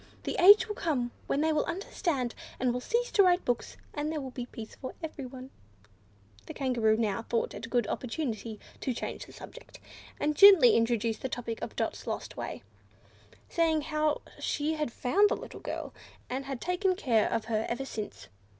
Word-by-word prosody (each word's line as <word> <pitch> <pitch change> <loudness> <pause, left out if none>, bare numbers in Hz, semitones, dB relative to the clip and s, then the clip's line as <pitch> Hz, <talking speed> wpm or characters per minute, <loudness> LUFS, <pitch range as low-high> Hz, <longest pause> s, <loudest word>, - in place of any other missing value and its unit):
The - - -2
age 410 +4 +9
will 420 - -3
come 275 -11 -1 0.2
when 280 - +1
they 315 0 +2
will 305 - +2
understand, 330 - -2 0.3
and 250 -1 +1
will 250 - -2
cease 475 - 0
to 405 - +5
write 360 -1 +4
books, 245 -1 -2 0.2
and 295 +1 -2
there 315 - -2
will 265 -2 -6
be 245 -1 -5
peace 225 -3 -9
for 260 - -8
everyone." 265 -4 -7 1.0
The - - -7
Kangaroo 235 -5 +2
now 220 -1 0
thought 230 0 -1
it 215 +3 -6
a - - -14
good 240 -2 +2
opportunity 230 -3 -3 0.2
to 255 - -2
change - - -5
the - - -13
subject, - - -12 0.4
and 300 0 +1
gently 380 -9 +9
introduced 230 -1 +1
the 260 - -2
topic 235 -2 -4
of - - -5
Dot's - - -3
lost - - -4
way, - - -5 0.8
saying 325 -2 +2
how 305 0 0 0.2
she 300 +1 -1
had 300 -5 -2
found 400 - +3
the - - +1
little - - -9
girl, - - -5 0.4
and 265 +2 -2
had 270 -2 -4
taken 365 +1 +1
care 235 - +2
of 225 - -1
her 220 -1 -1
ever 255 +3 -2
since. 205 - -6
260 Hz, 185 wpm, -30 LUFS, 235-315 Hz, 1.0 s, age